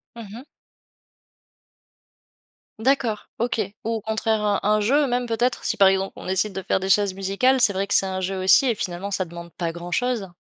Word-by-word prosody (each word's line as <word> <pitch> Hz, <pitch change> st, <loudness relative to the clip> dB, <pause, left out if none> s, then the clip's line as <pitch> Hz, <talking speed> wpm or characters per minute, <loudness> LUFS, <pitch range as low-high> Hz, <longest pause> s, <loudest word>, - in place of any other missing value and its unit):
Mmh 230 Hz, -2 st, -9 dB
mh. 240 Hz, +4 st, -10 dB, 2.4 s
D'accord, 245 Hz, -3 st, 0 dB
OK. 235 Hz, -1 st, -1 dB, 0.2 s
Ou -, -, -3 dB
au 225 Hz, -, -2 dB
contraire 220 Hz, 0 st, -1 dB
un 205 Hz, -1 st, +1 dB
un 215 Hz, +1 st, +3 dB
jeu, 280 Hz, +7 st, +2 dB
même 245 Hz, 0 st, -1 dB
peut-être 240 Hz, +2 st, -1 dB
si, -, -, 0 dB
par 195 Hz, -, +6 dB
exemple, 195 Hz, 0 st, 0 dB
on -, -, -10 dB
décide 190 Hz, +2 st, 0 dB
de 190 Hz, 0 st, -5 dB
faire, -, -, 0 dB
des 190 Hz, -, -3 dB
chaises 200 Hz, -2 st, +3 dB
musicales. 200 Hz, +8 st, +1 dB
C'est 230 Hz, -4 st, +5 dB
vrai 195 Hz, +1 st, -2 dB
que 200 Hz, -, -1 dB
c'est -, -, +5 dB
un 190 Hz, 0 st, -3 dB
jeu 190 Hz, +1 st, -3 dB
aussi 225 Hz, +8 st, +5 dB
et 235 Hz, -, +2 dB
finalement 190 Hz, +1 st, -5 dB
ça 185 Hz, -, 0 dB
demande 170 Hz, 0 st, -11 dB
pas 170 Hz, -2 st, -3 dB
grand 175 Hz, +1 st, -8 dB
chose. 230 Hz, -5 st, -1 dB
205 Hz, 205 wpm, -23 LUFS, 190-235 Hz, 2.4 s, par